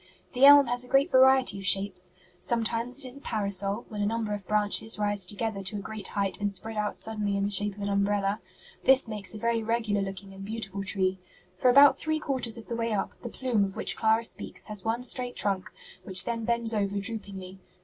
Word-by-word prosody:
The 255 +2 +5
elm 285 0 +9
has 245 0 +1
a - - -6
great 275 +2 +2
variety 260 -5 +5
of 195 - -8
shapes; 195 -2 +2 0.3
sometimes 235 +3 -1
it - - -5
is 255 - -5
a - - -13
parasol, 200 -1 -1
when 210 -2 -5
a - - +1
number 220 -1 -2
of 205 -2 -7
branches 210 +1 +2
rise 205 -2 -2
together 205 0 -3
to 195 +2 0
a - - -3
great 210 0 -5
height 200 0 -1
and 205 0 0
spread 220 +3 -7
out 210 -1 -2
suddenly 210 -2 -3
in 200 - -1
the 200 - -1
shape 205 0 +5
of 205 - -8
an 200 - -2
umbrella. 200 0 0 0.4
This 265 -1 +5
makes 210 -1 -4
a - - -5
very 230 +1 0
regular 220 -2 -1
looking 195 0 -7
and 195 0 -10
beautiful 200 -2 -4
tree. 190 -1 -1 0.4
For 250 +7 +2
about 275 +1 +7
three 315 -1 -1
quarters 260 -6 -3
of 225 - -10
the 235 - -5
way 230 -1 -2
up, 200 - -2
the 240 - -6
'plume' 240 -4 0
of 195 -1 -4
which - - 0
Clara 220 +1 +2
speaks - - -6
has 210 -3 -2
one 230 +2 -2
straight 250 0 -4
trunk, 195 -2 -2 0.3
which 185 -1 -1
then 230 -1 -3
bends 235 -1 0
over 200 -2 -1
droopingly. 200 -3 -4
215 Hz, 220 wpm, -27 LUFS, 200-235 Hz, 0.4 s, elm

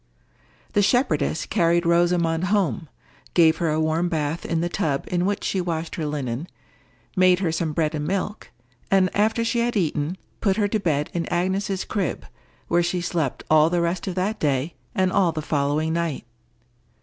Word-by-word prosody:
The 205 - +4
shepherdess 205 - +1
carried 170 -3 +2
Rosamond 170 0 +2
home, 175 - 0 0.5
gave 165 -2 +5
her 170 -2 0
a 155 +1 +1
warm 160 +2 +1
bath 160 0 -2
in 165 - 0
the 170 - 0
tub 160 -6 -1
in 180 +1 +1
which 205 - -1
she 190 - 0
washed 165 -2 -3
her 155 -3 -3
linen, 140 0 -3 0.7
made 185 -1 +5
her 180 -3 0
some 160 -1 -1
bread 155 0 0
and 150 -1 -3
milk, 200 +3 -3 0.4
and 190 -2 +3
after 220 +3 +2
she 235 +1 0
had 235 -1 0
eaten 155 -3 0
it, - - -13 0.2
put 195 -1 +2
her 205 -2 +2
to 215 - 0
bed 150 -6 0
in 170 -1 -2
Agnes's 190 +2 -1
crib, 190 - -2 0.4
where 170 +1 +3
she 175 +1 0
slept 165 -6 -2
all 155 0 +5
the 175 0 +1
rest 170 +3 -1
of 185 - -3
that 200 +4 -1
day 145 +2 0 0.2
and 185 -1 +2
all 185 -3 +3
the 160 - -4
following 150 +1 0
night. 165 -6 -2
170 Hz, 185 wpm, -23 LUFS, 155-190 Hz, 0.7 s, gave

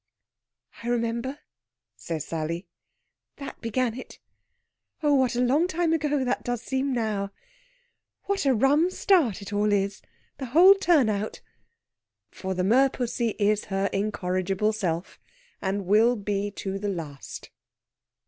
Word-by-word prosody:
"I 230 - -7
remember," 235 +3 -1 0.6
says 150 +9 -5
Sally. 165 +3 -3 0.7
"That 280 - -9
began 230 +1 0
it. 255 - -10 0.9
Oh, 295 -1 +4
what 260 -3 +2
a 245 - +1
long 280 +8 +3
time 340 -1 0
ago 295 -4 0
that 245 - -1
does 245 -1 -3
seem 265 +2 -1
now! 215 -5 -1 0.9
What 395 -7 -1
a 270 - +5
rum 290 +9 +3
start 310 - +2
it 200 - -8
all 205 +1 +2
is 200 -1 0 0.4
the 265 - -4
whole 375 +3 +10
turn 345 - +3
out!" 215 0 -2 0.9
For 190 0 -4
the 180 - 0
merpussy 240 0 +2
is 210 0 +1
her 195 0 -1
incorrigible 195 0 0
self, 180 -5 -3 0.4
and 195 0 -2
will 220 +6 +4
be 205 -1 -2
to 195 -1 -5
the 205 0 -2
last. 155 -7 -7
220 Hz, 135 wpm, -26 LUFS, 195-265 Hz, 0.9 s, whole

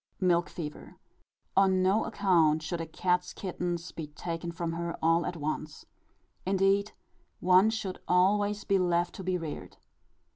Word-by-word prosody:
Milk 175 -2 +2
Fever. 150 -3 -8 0.6
On 190 -1 +4
no 195 +4 +3
account 170 -8 +2
should 165 +2 -3
a 165 - -5
cat's 180 +2 0
kittens 175 -2 -4
be 160 -2 -6
taken 165 +3 -5
from 170 0 -3
her 170 0 -4
all 165 +1 +2
at 180 - -4
once. 155 0 -4 0.6
Indeed, 195 +2 +2 0.5
one 185 +4 +5
should 220 -4 -4
always 205 +3 +2
be 195 -2 +2
left 175 -1 +1
to 190 - -8
be 185 0 0
reared. 160 -4 -7
180 Hz, 145 wpm, -29 LUFS, 165-190 Hz, 0.6 s, one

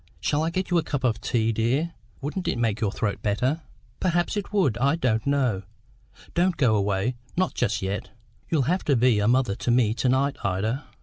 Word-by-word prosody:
Shall 145 - 0
I 160 - +1
get 185 +2 -3
you 175 - +4
a - - -2
cup 140 -3 -3
of 115 -4 +1
tea, 115 -1 +1
dear? 130 +10 0 0.3
Wouldn't 155 +7 -3
it - - 0
make 115 -2 0
your 105 -3 +1
throat 105 -1 -2
better?" 125 +10 0 0.4
"Perhaps 175 0 +1
it 205 -1 -3
would; 185 - +2
I 140 +4 +3
don't 120 -7 0
know. 130 -9 +1 0.7
Don't 175 0 +2
go 125 -6 +3
away, 100 +4 0 0.2
not 185 0 +1
just 105 - -1
yet. 95 0 -3 0.4
You'll 155 -5 +2
have 180 +8 0
to 140 - +3
be 120 -2 +4
a 105 - +1
mother 125 -3 +3
to - - -3
me 120 -3 +3
to 125 +2 0
night, 135 +2 +1
Ida. 110 +9 -1
125 Hz, 205 wpm, -25 LUFS, 110-155 Hz, 0.7 s, you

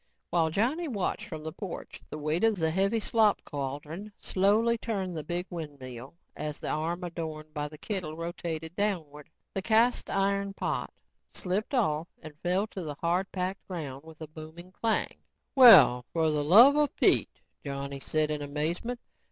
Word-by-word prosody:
While 165 -2 +2
Johnny 255 - 0
watched 205 -9 -2
from 155 -1 -7
the 160 0 -5
porch, 190 -4 -7
the - - -6
weight 155 +4 -1
of 225 -1 +4
the 160 -3 0
heavy 195 +6 +1
slop 215 -1 +3
cauldron 145 +8 -5
slowly 210 +5 +2
turned 195 -6 -3
the 155 - -4
big 175 +3 -3
windmill 140 -5 -8 0.2
and 150 - -4
as 150 - -5
the - - -4
arm 170 +4 -2
adorned 160 -3 -6
by 150 -1 -2
the 150 +1 -12
kettle 175 -5 -4
rotated 165 -1 -5
downward, 165 -8 -2 0.2
the 195 - -1
cast 230 +4 +2
iron 200 0 0
pot - - -2 0.4
slipped 200 +8 -2
off 160 -9 +1 0.2
and 155 -1 -9
fell 180 +3 +1
to 190 - -6
the 150 -2 -5
hard 175 +5 -1
packed 185 +1 -4
ground 145 -7 -6
with 160 -1 -14
a 155 - -6
booming 160 +3 -11
clang. 225 +3 -1 0.4
"Well, 185 - +9
for 160 -2 +2
the 150 -1 0
luvva 265 - +7
Pete," - - +3 0.2
Johnny 140 -1 -5
said 155 +2 0
in 150 -1 -2
amazement. 160 +12 -2
170 Hz, 170 wpm, -29 LUFS, 155-200 Hz, 0.4 s, Well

